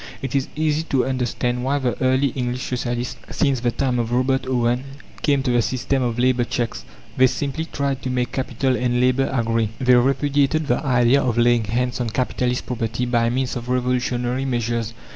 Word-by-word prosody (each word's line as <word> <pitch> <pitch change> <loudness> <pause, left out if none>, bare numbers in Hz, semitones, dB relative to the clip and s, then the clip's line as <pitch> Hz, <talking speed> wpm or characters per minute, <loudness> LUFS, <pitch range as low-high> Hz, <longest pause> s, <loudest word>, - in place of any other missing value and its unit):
It 135 0 -3
is 135 -1 +1
easy 155 0 +1
to 135 -2 +2
understand 125 -1 -1
why 135 +2 +1
the 130 -3 -1
early 130 +2 +3
English 125 0 -3
socialists, 120 -1 -3
since 140 -4 +1
the 120 0 +1
time 125 0 0
of 115 0 -2
Robert 130 +2 +1
Owen, 125 0 +1 0.4
came 140 -3 +2
to 130 - 0
the 120 -1 +3
system 130 +3 -1
of 120 -2 -1
labour 125 0 +2
cheques. 120 -1 -3 0.3
They 130 0 +6
simply 145 +4 -3
tried 140 -4 -2
to 130 - -3
make 125 -1 -1
Capital 130 0 -1
and 125 -1 0
Labour 130 +2 +2
agree. 115 -3 0
They 125 -1 +4
repudiated 140 +4 +2
the 120 +1 0
idea 125 0 +3
of 120 -3 -1
laying 120 -1 +3
hands 125 +3 -1
on 120 - -1
capitalist 125 +1 -1
property 120 -1 -2
by 120 -1 +2
means 130 +1 -1
of 120 0 -6
revolutionary 125 0 0
measures. 115 -2 -2
125 Hz, 185 wpm, -22 LUFS, 120-135 Hz, 0.4 s, They